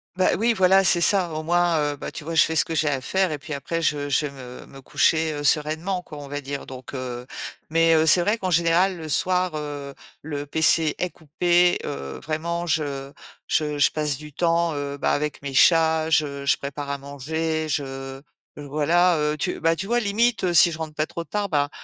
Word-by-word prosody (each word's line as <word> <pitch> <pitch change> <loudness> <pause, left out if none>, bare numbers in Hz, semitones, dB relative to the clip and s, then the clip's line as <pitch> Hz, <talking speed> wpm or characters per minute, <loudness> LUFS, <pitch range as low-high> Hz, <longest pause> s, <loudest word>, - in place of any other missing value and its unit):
Bah, 185 - +2
oui, 235 +1 +3
voilà, 190 -1 +4
c'est 185 -2 +4
ça. 185 -3 +3
Au 155 0 -4
moins, 175 0 +2
heu, - - -8
bah, - - -7
tu - - -8
vois? 165 - -5
Je 160 - +6
fais 160 - -2
ce - - +3
que 165 - -5
j'ai 155 -1 +1
à 135 -2 -1
faire 190 +1 0
et 150 - -2
puis 150 +1 -8
après, 165 +4 -3
je 145 -2 0
je 150 - +1
vais 145 - -5
me 125 -2 -11
me 135 0 -14
coucher, 160 +3 +1
heu, 145 0 -5
sereinement 160 +6 0
quoi, 155 -4 -11
on 145 - -8
va 145 +1 -5
dire, 140 0 -6
donc 130 +1 -9
heu 125 -1 -6 0.4
mais 165 +1 +3
heu, 160 0 +4
c'est 175 +3 +5
vrai 210 +6 +1
qu'en 185 - -2
général, 170 +2 +2
le 160 -2 -7
soir, 180 +1 +1
heu, 145 -2 -6 0.3
le 145 -2 -5
PC 160 0 +2
est 180 - -1
coupé, 175 +3 +2
heu, 70 - -6
vraiment, 170 +3 -3
je 140 -4 -2 0.4
je 150 -1 0
je 145 - +4
passe 150 -3 -1
du 150 0 -11
temps, 170 0 +1
heu, 145 0 -4
bah, - - 0
avec 150 -1 -3
mes 140 -1 -5
chats. 160 +1 +4
Je 140 -3 0
je - - +4
prépare 140 +1 -6
à 140 - -2
manger, 155 +3 -3
je 135 -2 -4 0.4
voilà, 160 +5 +2
heu, 150 0 0
tu 180 +4 -2
bah, 165 0 +2
tu 180 +4 -5
vois? 240 +4 +1
Limite, 225 +2 +1
heu, 175 - +1
si 170 +2 +7
je 160 - -7
rentre 155 -1 -6
pas 155 - 0
trop 170 +1 -6
tard, 205 +3 -3
ben, 145 -5 0
155 Hz, 225 wpm, -23 LUFS, 145-170 Hz, 0.4 s, si